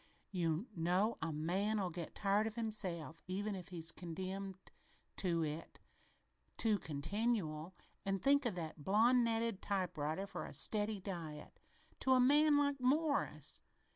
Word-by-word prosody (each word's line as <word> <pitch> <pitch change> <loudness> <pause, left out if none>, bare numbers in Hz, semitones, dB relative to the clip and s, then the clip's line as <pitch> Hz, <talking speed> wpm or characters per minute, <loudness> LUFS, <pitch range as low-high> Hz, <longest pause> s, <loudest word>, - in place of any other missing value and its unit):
"You 170 0 0
know 180 +7 +1
a 160 0 -1
man'll 185 +5 0
get 170 -1 -6
tired 205 +2 +2
of 220 - -5
himself, 180 - 0
even, 205 +3 -2
if 185 -3 -6
he's 170 -2 -1
condemned 190 +3 -5 0.6
to 170 -3 +1
it 155 +2 -6 0.8
too 215 -3 +3
continual, 165 +1 -2 0.3
and 195 -1 0
think 280 +3 +4
of 215 - -2
that 160 -3 -5
blondinetted 230 - +3
typewriter 180 -3 -1
for 200 - -6
a - - -9
steady 210 -1 +2
diet 165 -6 -7 0.4
to 260 - +4
a 255 - +5
man 290 +3 +6
like 285 -1 +2
Morris! 285 +4 +1
195 Hz, 135 wpm, -37 LUFS, 170-225 Hz, 0.8 s, man